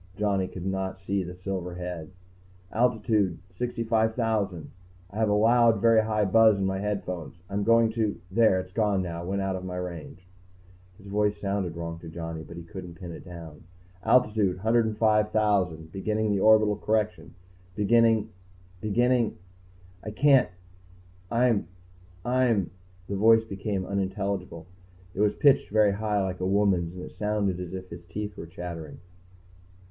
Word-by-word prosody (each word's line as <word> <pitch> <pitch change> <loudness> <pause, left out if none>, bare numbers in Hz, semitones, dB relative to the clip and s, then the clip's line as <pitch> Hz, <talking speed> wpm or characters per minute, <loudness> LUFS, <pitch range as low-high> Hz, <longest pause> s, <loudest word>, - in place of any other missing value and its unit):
Johnny 100 -3 0
could 90 -1 -8
not 95 0 -3
see 95 +1 -1
the 90 +1 -8
silver 90 -1 -5
head. 90 -3 -6 0.6
"Altitude... 110 -6 +1
65,000.... 110 - -1 0.4
I 100 - -9
have 110 -1 +2
a - - +3
loud, 115 +1 +4
very 115 +1 +5
high 105 -1 +1
buzz 110 +1 +5
in 95 - -1
my 95 0 -1
headphones. 90 -7 -4
I'm 100 +1 -2
going 115 0 +4
to 110 -2 -1
there, 110 -2 +4
it's 95 0 -7
gone 105 -2 +1
now, 85 -1 -5
went 95 +2 -2
out 95 -1 -1
of 95 - -6
my 90 -1 -5
range." 90 -1 -7 0.7
His 100 - -17
voice 105 +1 0
sounded 100 -4 -2
wrong 85 0 -5
to 85 - -10
Johnny, 80 -1 -6
but 85 +2 -11
he 85 - -7
couldn't 85 0 -9
pin 85 -2 -7
it 80 - -9
down. 85 -4 -11 0.4
"Altitude... 105 -6 +3
105,000. 105 -5 +1
Beginning 105 +1 -1
orbital 110 0 +5
correction. 105 -6 -1 0.4
Beginning 110 0 +3 0.5
beginning... 120 +2 +1 0.7
I - - -5
can't 135 +3 +4 0.8
I'm 115 -6 +2 0.6
I'm 120 -8 +1 0.2
" 90 0 -28
The 100 - -3
voice 115 +2 +5
became 100 -2 -3
unintelligible. 100 -3 -3 0.5
It - - -8
was 105 -1 +2
pitched 140 -2 +4
very 105 -1 +4
high, 105 0 0
like 95 -1 -3
a 90 - -2
woman's, 95 -4 +1
and 90 - -7
it - - -8
sounded 105 -3 -1
as 90 0 -6
if 95 0 -8
his 85 +1 -9
teeth 105 +3 -5
were 85 - -8
chattering. 85 -3 -7
100 Hz, 150 wpm, -27 LUFS, 90-110 Hz, 0.8 s, very